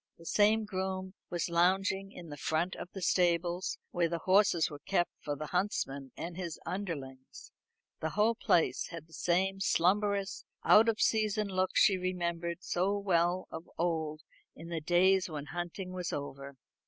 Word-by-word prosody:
The 165 - -15
same 215 +4 +3
groom 190 -1 -3 0.2
was 170 -3 -1
lounging 190 +3 +2
in 170 -6 -9
front 160 +4 -1
of - - -7
the 190 - -7
stables, 175 0 +1
where 175 -2 +1
the 170 - -1
horses 185 -2 +3
were 145 - -9
kept 175 +2 0
for 145 - -3
the 155 - -5
huntsman 140 -7 -2
and 170 +1 -5
his 175 -3 -5
underlings. 140 -9 -6 0.5
The 160 - -1
whole 210 +6 +2
place 175 -6 +1
had 165 -2 -8
the 160 - -21
same 190 +5 +1
slumberous 200 +2 +1 0.2
out 225 +2 +7
of 220 - 0
season 215 -2 +2
look 185 -1 0
she 195 -3 +5
remembered 170 -1 -2
so 190 +3 0
well 180 -2 +1
of 160 +1 -8
old 160 -2 -1 0.3
in 165 +2 -10
the 165 -2 -3
days 185 +3 +3
when 150 -3 -5
hunting 175 +3 -5
was 180 -1 -4
over. 140 -1 -6
175 Hz, 160 wpm, -32 LUFS, 165-195 Hz, 0.5 s, out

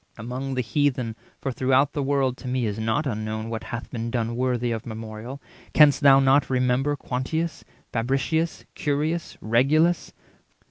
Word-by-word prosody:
Among 130 +4 -4
the 130 - +1
Heathen 125 -2 0 0.3
(for 135 - -2
throughout 130 +3 +2
the 145 - -1
world 135 -2 +1
To 130 - -9
me 125 -1 0
is 105 0 -3
not 115 +7 0
unknown 110 -2 -3
what 115 - -4
hath 120 -2 -6
been 115 -2 -3
done 115 -1 -1
Worthy 125 -1 0
of 110 -1 -3
memorial) 110 +3 -7 0.4
canst 150 -2 +6
thou 135 -2 +7
not 135 +1 +4
remember 130 +2 +1
Quintius, 150 +5 -3 0.3
Fabricius, 135 +8 0
Curius, 155 +3 -2
Regulus? 150 +10 +2
130 Hz, 150 wpm, -25 LUFS, 115-145 Hz, 0.4 s, thou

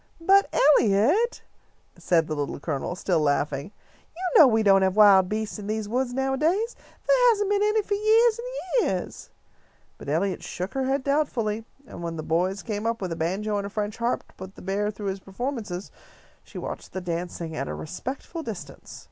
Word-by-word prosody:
"But, 390 +4 +4 0.3
Eliot," 275 - +2 0.5
said 165 -2 +2
the 155 - -4
Little 145 -1 -3
Colonel, 150 +3 -3
still 180 -2 0
laughing, 145 +2 0 0.4
"you 365 +1 +2
know 305 - +10
we 225 -2 +2
don't 195 -2 +5
have 190 0 +2
wild 195 -3 +6
beasts 215 0 -3
in 205 - -7
these 215 0 -2
woods 250 +3 -1
nowadays. 300 - 0 0.3
There - - +5
hasn't 410 -3 +1
been 405 0 +2
any 425 +1 +2
for 410 - -2
yeahs 440 +3 +4
and 485 - -5 0.4
yeahs." 185 -2 -5 0.7
But - - -8
Eliot 180 +6 0
shook 180 +2 -5
her 270 -1 -1
head 270 +1 0
doubtfully, 235 -7 0 0.2
and 170 - -10
when 170 -1 -4
the 155 - -5
boys 180 +5 0
came 215 0 -3
up 230 0 -1
with 185 -3 -4
a - - -2
banjo 200 +6 -1
and 200 0 -5
French 210 0 -3
harp 235 +1 -1
to - - -24
put 190 +1 -10
the - - -12
bear 200 +2 -1
through 205 -1 -4
his 190 0 -4
performances, 205 -2 -5 0.5
she - - -12
watched - - -7
the 190 - -4
dancing 170 -2 -4
at 135 -1 -3
a - - -4
respectful 260 - -6
distance. 175 - -8
210 Hz, 190 wpm, -25 LUFS, 180-275 Hz, 0.7 s, know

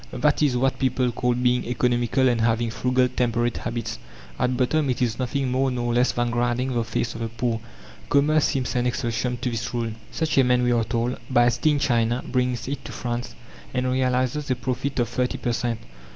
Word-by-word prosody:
That - - +1
is 140 -5 +3
what 135 +1 +1
people 130 -1 +1
call 125 0 0
"being 125 0 +2
economical 120 +2 +1
and 120 -2 +2
having 115 0 +1
frugal, 125 +4 +2
temperate 120 -1 0
habits." 120 0 -4 0.4
At 125 0 +1
bottom 140 +3 +1
it 125 - 0
is 120 -2 0
nothing 130 +1 -1
more 135 +1 +2
nor 120 -1 -1
less 125 +2 +3
than 120 0 -1
grinding 120 +2 0
the 120 -1 +1
face 115 +1 -2
of 115 - -7
the 115 - -1
poor. 115 0 -2 0.5
Commerce 150 +2 +4
seems 130 -4 -1
an 125 0 +1
exception 125 0 -1
to 125 - -2
this 115 +1 -3
rule. 115 -1 -1 0.2
"Such 155 -3 +1
a - - +7
man," 125 0 +3
we 125 - +2
are 115 -2 +2
told, 120 +2 -1
"buys 120 -2 +3
tea 155 - +3
in 150 - +3
China, 120 -2 +1
brings 125 -1 -1
it 140 0 -4
to - - -6
France, 120 0 -4 0.4
and 125 0 +1
realizes 130 +2 0
a 130 - +2
profit 130 +3 -3
of 120 -2 +2
thirty 125 +2 -1
per 120 - -1
cent. 115 -1 -1
125 Hz, 210 wpm, -24 LUFS, 120-130 Hz, 0.5 s, a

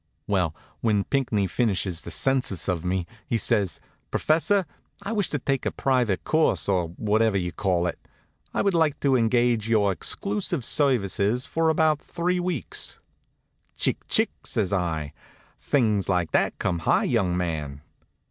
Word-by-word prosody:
Well, 90 -6 0 0.2
when 105 -3 +1
Pinckney 120 -7 0
finishes 95 -4 -1
his 85 - -4
census 130 -9 +1
of 90 -4 -1
me 90 0 -1 0.2
he 115 - +1
says: 100 -7 +1 0.3
"Professor, 185 +5 +2 0.4
I 205 - -4
wish 205 -5 0
to 145 - -1
take 135 0 -1
a - - 0
private 125 -8 0
course, 160 0 +1
or 90 -4 +1
whatever 110 0 +2
you 90 -2 -2
call 90 +1 0
it. 90 - -3 0.5
I - - 0
would 200 -1 +2
like 160 -4 +2
to 135 -2 +3
engage 120 -2 +2
your 105 -3 +3
exclusive 180 - -2
services 120 -4 +1
for 165 0 +1
about 155 -1 +2
three 180 +1 -1
weeks." 175 -6 -3 0.8
"Chic, - - +1
chic!" - - +3
says 100 -2 -1
I. 80 -6 -1 0.5
"Things 110 -9 +1
like 90 -3 +1
that - - +1
come 90 -4 -1
high, - - +2
young 90 -2 +1
man." 75 -5 -3
110 Hz, 150 wpm, -25 LUFS, 90-140 Hz, 0.8 s, to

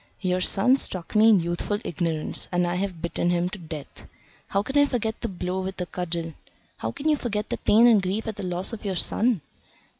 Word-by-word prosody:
Your 185 -1 +1
son 225 +8 +4
struck 185 -9 -3
me 220 +1 +7
in 210 -4 +6
youthful 175 +4 -1
ignorance, 165 -2 -2
and 180 0 +2
I 175 - -1
have 180 -2 -3
bitten 170 0 0
him 175 0 +1
to 195 - -7
death. 155 -4 -9 0.4
How 200 +1 +1
can 270 - -5
I 285 0 +6
forget 230 -4 -2
the - - -1
blow 185 0 -3
with 190 +1 -5
the 180 - -2
cudgel? 175 -1 -3
And 165 - -7 0.5
how - - -2
can 290 - -4
you 310 - +5
forget 215 -6 -3
the - - 0
pain 225 +3 +5
and 225 -4 +6
grief 195 +5 -2
at 220 - -3
the 205 - -5
loss 180 +4 -3
of 225 - -6
your 195 -2 -2
son?" 220 +2 +1
190 Hz, 230 wpm, -25 LUFS, 175-220 Hz, 0.5 s, me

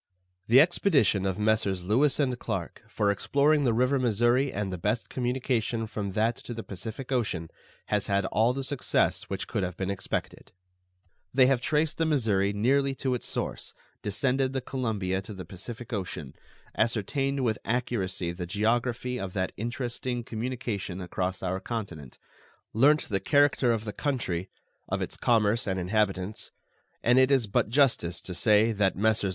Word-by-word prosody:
The 120 +4 +7
expedition 140 - +3
of 95 -1 -1
Messrs. 105 -4 +1
Lewis 130 +11 +2
and 130 -4 +1
Clarke 95 -6 -4
for 100 -1 +1
exploring 145 +7 +2
the 120 - +3
river 125 +4 +2
Missouri 120 +3 +2
and 100 -1 -3
the 90 - -3
best 105 +6 -1
communication 125 -2 -1
from 105 -3 -4
that 110 +3 +1
to 120 - -8
the 115 - -5
Pacific 110 +7 -7
Ocean 100 -10 -1 0.3
has 105 -2 -1
had 100 -1 +1
all 110 +5 +2
the 135 +2 -3
success 140 -1 0
which - - -3
could - - -2
have 90 -1 -3
been 95 0 -2
expected. 100 - -4 0.8
They 130 0 +5
have 130 -1 +2
traced 150 +4 0
the 165 - +2
Missouri 110 -10 +2
nearly 135 +6 +2
to 130 -1 -1
its 125 - -3
source, - - -4 0.3
descended 130 +6 0
the 135 - 0
Columbia 105 -8 -2
to 105 +1 -9
the 95 -2 -7
Pacific 110 +8 -8
Ocean, 90 -9 -4 0.4
ascertained 135 +5 0
with 110 -3 0
accuracy 100 -7 -1
the 90 0 -6
geography 120 +5 0
of 95 -2 -5
that 95 -2 -1
interesting 120 +1 -3
communication 115 -5 -4
across 90 +1 -3
our 95 0 -1
continent, 95 - -6 0.6
learnt 145 +7 +4
the 100 -3 0
character 140 +2 +3
of 110 -1 -1
the 105 - -4
country, 100 - -2 0.4
of - - -1
its - - -4
commerce 115 -1 +2
and 95 -1 -1
inhabitants; 95 +1 -1 0.5
and 125 +2 +5
it 130 0 +5
is 135 -4 +3
but 100 0 0
justice 115 - +2
to 90 - -6
say 105 +4 +4
that 100 -3 +1
Messrs. 110 0 +2
110 Hz, 165 wpm, -28 LUFS, 95-130 Hz, 0.8 s, The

